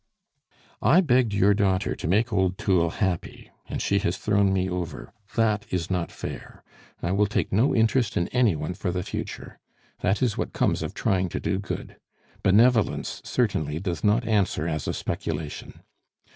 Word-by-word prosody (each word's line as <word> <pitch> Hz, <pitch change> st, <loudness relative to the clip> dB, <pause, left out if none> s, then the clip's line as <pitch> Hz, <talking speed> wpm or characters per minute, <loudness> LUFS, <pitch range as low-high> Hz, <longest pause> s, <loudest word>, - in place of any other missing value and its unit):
"I 170 Hz, +6 st, +5 dB
begged 125 Hz, -, +3 dB
your 100 Hz, 0 st, +4 dB
daughter 95 Hz, -2 st, +1 dB
to -, -, -5 dB
make 110 Hz, +6 st, +2 dB
old 95 Hz, -1 st, +1 dB
Thoul 85 Hz, -4 st, +2 dB
happy, 90 Hz, -1 st, -3 dB, 0.2 s
and -, -, -3 dB
she 100 Hz, -, +2 dB
has 90 Hz, +1 st, -1 dB
thrown 100 Hz, -2 st, +2 dB
me 95 Hz, -1 st, +1 dB
over. 85 Hz, -10 st, -5 dB, 0.2 s
That 110 Hz, -3 st, +1 dB
is 90 Hz, 0 st, -2 dB
not 90 Hz, -2 st, -1 dB
fair. -, -, -8 dB, 0.4 s
I 85 Hz, -, 0 dB
will 100 Hz, +2 st, +3 dB
take 100 Hz, -, -1 dB
no 115 Hz, +8 st, +3 dB
interest 115 Hz, +1 st, +2 dB
in 85 Hz, -, +1 dB
any 120 Hz, -8 st, +3 dB
one 75 Hz, +4 st, -3 dB
for 95 Hz, +1 st, -3 dB
the 90 Hz, 0 st, -2 dB
future! -, -, -6 dB, 0.4 s
That 100 Hz, +7 st, +1 dB
is 120 Hz, -4 st, 0 dB
what -, -, -3 dB
comes -, -, +1 dB
of -, -, -5 dB
trying 95 Hz, -1 st, +1 dB
to -, -, -3 dB
do 95 Hz, -, -1 dB
good! 100 Hz, -, -6 dB, 0.4 s
Benevolence 110 Hz, +3 st, +3 dB
certainly 80 Hz, -, -1 dB
does 85 Hz, -4 st, -3 dB
not 110 Hz, +3 st, +2 dB
answer 100 Hz, -7 st, +1 dB
as 80 Hz, -3 st, -3 dB
a -, -, 0 dB
speculation! 75 Hz, -1 st, -5 dB
95 Hz, 170 wpm, -25 LUFS, 90-110 Hz, 0.4 s, I